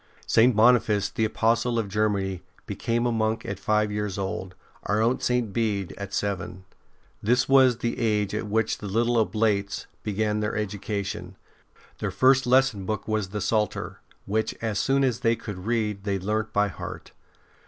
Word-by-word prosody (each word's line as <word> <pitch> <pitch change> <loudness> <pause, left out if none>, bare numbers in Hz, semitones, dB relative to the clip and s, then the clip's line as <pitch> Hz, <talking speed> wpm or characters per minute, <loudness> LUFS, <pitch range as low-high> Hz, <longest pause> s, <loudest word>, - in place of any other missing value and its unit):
7S - - -34
ST. - - -33
BENEDICT - - -12
St. 120 +1 +5
Boniface, 110 -3 +4
the 110 - 0
Apostle 115 +2 +1
of 115 -3 0
Germany, 100 -3 0 0.2
be - - -5
came 120 +1 0
a 120 - +2
monk 110 0 0
at 100 -1 -4
five 105 +1 +1
years 105 -2 -3
old, 95 -1 -4 0.3
our 105 - +1
own 120 +3 +2
St. 125 -5 0
Bede 105 -6 -1
at 100 -1 -7
seven. 95 -2 -3 0.6
This 125 +4 +2
was 130 -3 +5
the 120 0 -2
age 105 -3 +1
at 105 0 -2
which 110 +1 0
the 105 - -6
little 115 +4 +1
oblates 105 -1 0 0.2
began 105 +1 -1
their 105 0 -2
education. 100 -3 -4 0.6
Their - - -2
first 130 0 +3
lesson 130 -5 +3
book 110 -2 -3
was 110 -3 -1
the 105 +1 -4
Psalter, 105 +2 -1 0.3
which, 110 +2 -1
as 110 -3 -2
soon 135 0 +2
as 125 -4 +1
they 115 -2 +2
could 100 -3 -8
read, 105 -4 -1
they 100 -1 -1
learnt 110 +3 -2
by 105 -1 +2
heart. 85 - -8
105 Hz, 180 wpm, -26 LUFS, 100-115 Hz, 0.6 s, St